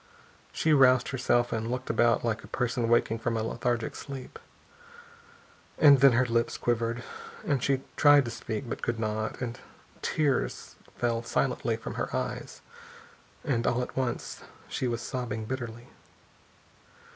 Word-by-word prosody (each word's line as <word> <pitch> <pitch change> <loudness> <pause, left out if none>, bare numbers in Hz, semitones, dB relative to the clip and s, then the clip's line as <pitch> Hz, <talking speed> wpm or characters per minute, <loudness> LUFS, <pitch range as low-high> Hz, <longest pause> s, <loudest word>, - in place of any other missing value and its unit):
She 160 - +2
roused 130 -3 +5
herself 120 -2 +1
and 115 0 -2
looked 125 +1 -3
about 120 0 +3
like 115 -1 -1
a - - -11
person 120 -1 -1
waking 115 -1 +2
from 115 0 -1
a 110 - -1
lethargic 115 0 -2
sleep. 135 -3 -8 1.4
And 145 -3 +7
then 135 -1 +7
her 125 +2 +3
lips 115 -1 0
quivered, 120 0 -1 0.4
and 140 -4 +1
she 135 0 +1 0.2
tried 145 -2 +6
to 120 - -4
speak 110 +2 -4
and 120 - -5
could 120 -1 -2
not, 110 0 -2
and 120 -2 -4 0.4
tears 145 -4 -1 0.2
fell 115 -1 0
silently 115 - 0
from - - -6
her - - -2
eyes, - - -4 0.8
and 125 -6 0
all 125 +1 +1
at - - -8
once 130 -3 -3 0.3
she 130 - -2
was 120 0 -2
sobbing 115 -4 -4
bitterly. 120 -1 -5
120 Hz, 145 wpm, -28 LUFS, 115-130 Hz, 1.4 s, And